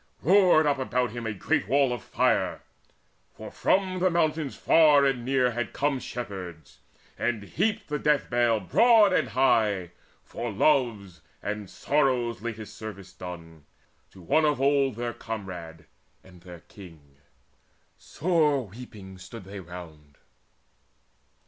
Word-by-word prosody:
Roared 180 -3 +5
up 145 -2 +1
about 125 -2 -1
him 120 0 -5
a - - -1
great 95 -1 -1
wall 135 +1 +2
of 120 - -5
fire; - - 0 0.7
For - - -9
from 185 -1 0
the 185 +1 +3
mountains 155 -4 0
far 150 -3 +5
and 130 -3 0
near 130 -1 +1
had 120 0 -4
come 140 -1 0
Shepherds, 95 -11 -8 0.4
and 115 -3 -1
heaped 205 - -2
the 150 0 -3
death 150 -2 +1
bale 120 -2 +2
broad 215 - +4
and 130 - +1
high 105 -7 +1 0.3
For 120 -1 -5
love's 105 - +1 0.2
and 105 -1 -4
sorrow's 125 -6 0
latest 110 -2 -7
service 100 -4 -9
done 85 -4 -10 0.4
To 95 - -16
one 155 - +2
of 150 -3 +1
old 135 -2 +2
their 120 +1 -4
comrade 90 -9 -7 0.4
and 90 -2 -17
their 90 -2 -12
king. 80 -7 -15 0.8
Sore 150 -6 0
weeping 100 -4 -11
stood 100 +4 -10
they 100 +2 -9
round. 80 -5 -12
120 Hz, 135 wpm, -26 LUFS, 95-140 Hz, 0.8 s, Roared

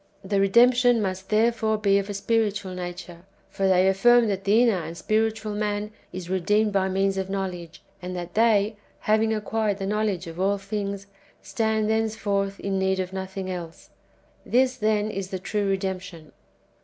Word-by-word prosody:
The 195 +1 0
redemption 240 +4 +5
must 190 -2 -3
therefore 220 0 +2
be 200 -2 +3
of 200 +1 -5
a 205 - -4
spiritual 205 -2 0
nature; 175 -1 -7 0.3
for 195 - 0
they 185 0 +4
affirm 235 +4 +4
that 195 -1 -3
the 215 +4 +5
inner 215 -7 +2
and 165 +1 -7
spiritual 220 +1 -1
man 210 0 -2 0.2
is 180 -1 -7
redeemed 205 +4 +1
by 190 -1 +1
means 195 +1 0
of 190 0 -2
know 195 0 -1
ledge, 175 -3 -9 0.2
and 180 0 -5
that 175 0 -6
they, 215 -1 +3 0.2
having 220 +1 +2
acquired 215 -1 -1
the 195 - -4
knowledge 205 -3 -1
of 165 +1 -9
all 200 +2 +2
things, 200 0 -4 0.4
stand 220 -1 0
thenceforth 210 -3 -1
in 195 -1 -2
need 190 0 +1
of 185 0 -3
nothing 190 0 -5
else. 175 -3 -7 0.5
This, 255 +1 +2
then, 215 0 0
is 195 -2 -5
the 190 - -3
true 200 +2 -2
redemption. 185 -4 -4
200 Hz, 170 wpm, -25 LUFS, 190-215 Hz, 0.5 s, redemption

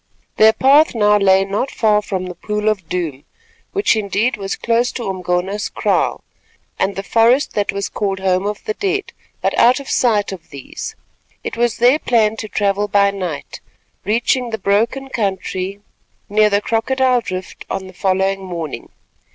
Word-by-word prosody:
Their 220 0 +6
path 280 +3 +4
now 210 -2 +4
lay 195 -1 +4
not 200 +7 -2
far 210 -2 +2
from 190 -3 -3
the 180 - -6
Pool 210 +4 -2
of 190 -6 -3
Doom, 160 -7 -3 0.5
which, 400 - +2
indeed, 215 +3 0
was 195 -1 -4
close 235 +1 +1
to 240 - -4
Umgona's 185 +2 -2
kraal, - - 0 0.6
and 195 - 0
the 195 - -4
forest 235 +6 +3
that 205 -1 0
was 200 -1 -3
called 195 -2 -2
Home 190 +1 +1
of 210 -1 -4
the 215 - -1
Dead, 400 - -2 0.3
but - - 0
out 250 +2 +5
of 280 - -7
sight 215 -5 +2
of 185 -4 -9
these. 140 -2 -7 0.5
It - - -4
was 235 -1 0
their 250 +5 +4
plan 220 -5 +2
to 215 - -5
travel 205 0 0
by 200 -1 +3
night, 180 -7 -5 0.4
reaching 240 +3 +1
the 220 - -3
broken 220 +7 0
country 195 -3 -3 0.5
near 210 +1 +3
the 205 0 +2
Crocodile 250 +3 +1
Drift 185 -4 -6
on 195 0 -3
the 185 - -12
following 190 +1 0
morning. 170 -4 -6
205 Hz, 165 wpm, -18 LUFS, 190-230 Hz, 0.6 s, Their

